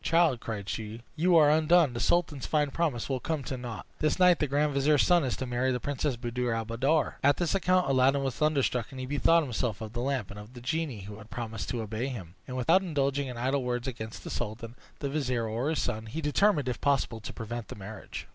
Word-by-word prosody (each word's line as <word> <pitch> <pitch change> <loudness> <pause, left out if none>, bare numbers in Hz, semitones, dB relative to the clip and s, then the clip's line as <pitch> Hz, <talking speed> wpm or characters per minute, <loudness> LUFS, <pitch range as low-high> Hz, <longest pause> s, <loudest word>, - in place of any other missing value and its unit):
"Child," 165 -7 +3
cried 105 -4 -5
she, 110 +2 -5
"you 170 +2 +4
are 150 -2 +6
undone; 160 -2 +4
the 120 - -4
sultan's 155 -3 +1
fine 150 -2 +1
promise 145 -7 -1
will 135 -2 -1
come 155 +1 -2
to 130 - -4
naught! 120 -3 -6
This 155 - +1
night 180 -2 +5
the 150 - +1
grand 145 +2 +1
vizier's 140 +1 +4
son 175 -2 +4
is 130 -4 -1
to 130 - -3
marry 125 +1 0
the 125 - -1
Princess 145 0 -1
Buddir 120 0 -2
al 115 0 -2
Buddoor." 135 +7 +1
At 145 +1 +4
this 175 -2 0
account 185 -1 +2
Aladdin 135 +1 +3
was 135 -2 -1
thunderstruck, 135 -6 +1
and 130 - -9
he 130 - -3
bethought 150 +5 +3
himself 120 -5 -2
of 110 0 -7
the 120 - -2
lamp, 130 -6 -1
and 100 - -9
of 105 +4 -12
the - - -8
genie 145 -4 -2
who 105 +2 -9
had 105 +1 -13
promised 115 -2 -5
to 120 -2 -2
obey 110 +4 -3
him; 100 -11 -7
and 130 -1 -5
without 165 +9 +4
indulging 140 -5 0
in 125 -2 -6
idle 130 +3 0
words 125 0 -2
against 110 -3 -6
the - - -6
sultan, 115 0 -4 0.3
the 140 - -1
vizier, 125 -6 -1
or 115 +6 -1
his 160 - 0
son, 110 +1 -3
he 130 +9 -5
determined, 150 0 +2
if 125 - -3
possible, 135 -5 +1
to 105 - -7
prevent 115 0 -6
the - - -8
marriage. 105 +2 -8
130 Hz, 240 wpm, -29 LUFS, 115-150 Hz, 0.3 s, are